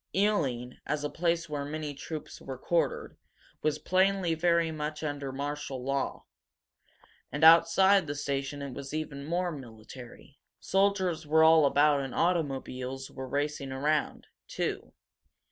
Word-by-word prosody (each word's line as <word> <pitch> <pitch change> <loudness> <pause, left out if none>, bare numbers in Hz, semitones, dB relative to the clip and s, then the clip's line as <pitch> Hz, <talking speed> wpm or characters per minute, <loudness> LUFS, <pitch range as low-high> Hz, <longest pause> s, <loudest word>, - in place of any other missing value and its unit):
Ealing, 140 - 0
as 150 -1 -1
a 145 - -2
place 170 0 0
where 145 -2 -3
many 150 0 -4
troops 150 +2 -8
were 130 -1 -7
quartered, 170 +6 -1 0.4
was 155 -1 0
plainly 185 +1 +2
very 170 0 +2
much 150 0 -4
under 145 -2 -3
martial 140 -1 -4
law. 135 0 -2 1.1
And 150 +2 -3
outside 170 +3 +6
the 145 - -3
station 140 0 -3
it 140 -2 -6
was 140 +3 -6
even 150 -3 -4
more 175 +2 0
military. 125 +1 -11 0.2
Soldiers 190 -5 +1
were 160 +1 +5
all 160 -2 +7
about 145 0 +3
and 135 -2 -5
automobiles 135 -6 -2
were 130 -1 -7
racing 145 -1 -2
around, 145 +3 -1 0.2
too. - - -3
150 Hz, 135 wpm, -29 LUFS, 140-165 Hz, 1.1 s, all